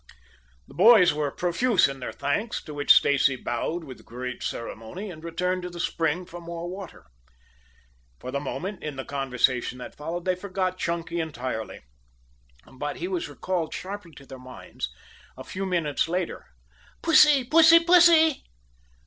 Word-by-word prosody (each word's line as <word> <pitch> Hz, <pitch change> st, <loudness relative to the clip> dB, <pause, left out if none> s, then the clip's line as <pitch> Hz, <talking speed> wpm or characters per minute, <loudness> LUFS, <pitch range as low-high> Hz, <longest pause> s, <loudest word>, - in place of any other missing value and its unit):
The -, -, -15 dB
boys 215 Hz, -8 st, +6 dB
were 150 Hz, -1 st, -1 dB
profuse 180 Hz, -, +2 dB
in 135 Hz, -1 st, -7 dB
their 125 Hz, -, -5 dB
thanks, 205 Hz, +11 st, -2 dB
to 150 Hz, -, -9 dB
which 145 Hz, 0 st, +2 dB
Stacy 140 Hz, -1 st, +5 dB
bowed 145 Hz, +8 st, -3 dB
with 130 Hz, -5 st, -11 dB
great 125 Hz, +1 st, -7 dB
ceremony 115 Hz, -, -6 dB
and 155 Hz, -2 st, -12 dB
returned 180 Hz, +2 st, -2 dB
to 180 Hz, -, -5 dB
the 175 Hz, 0 st, -10 dB
spring 165 Hz, +1 st, -1 dB
for 175 Hz, 0 st, -10 dB
more 170 Hz, 0 st, -6 dB
water. 185 Hz, -, -9 dB, 1.1 s
For 130 Hz, -, -7 dB
the 140 Hz, -, -1 dB
moment, 185 Hz, +8 st, -5 dB
in 150 Hz, -2 st, -5 dB
the 135 Hz, -, -6 dB
conversation 130 Hz, -2 st, 0 dB
that 125 Hz, -, -9 dB
followed, 170 Hz, +4 st, -6 dB
they 185 Hz, -, +2 dB
forgot 185 Hz, 0 st, -3 dB
Clunky 170 Hz, 0 st, -2 dB
entirely. 130 Hz, -8 st, -5 dB, 0.8 s
But 145 Hz, +3 st, -6 dB
he 355 Hz, -, -4 dB
was 365 Hz, -3 st, -3 dB
recalled 175 Hz, -4 st, -3 dB
sharply 185 Hz, -2 st, -7 dB
to 140 Hz, -, -14 dB
their 130 Hz, -1 st, -11 dB
minds 125 Hz, -, -8 dB, 0.5 s
a -, -, -8 dB
few 195 Hz, +1 st, -5 dB
minutes 165 Hz, -6 st, 0 dB
later. 175 Hz, +1 st, -3 dB, 0.6 s
"Pussy, 300 Hz, -4 st, +6 dB
pussy, 325 Hz, +5 st, +7 dB
pussy!" 335 Hz, -3 st, +5 dB
170 Hz, 155 wpm, -25 LUFS, 140-190 Hz, 1.1 s, pussy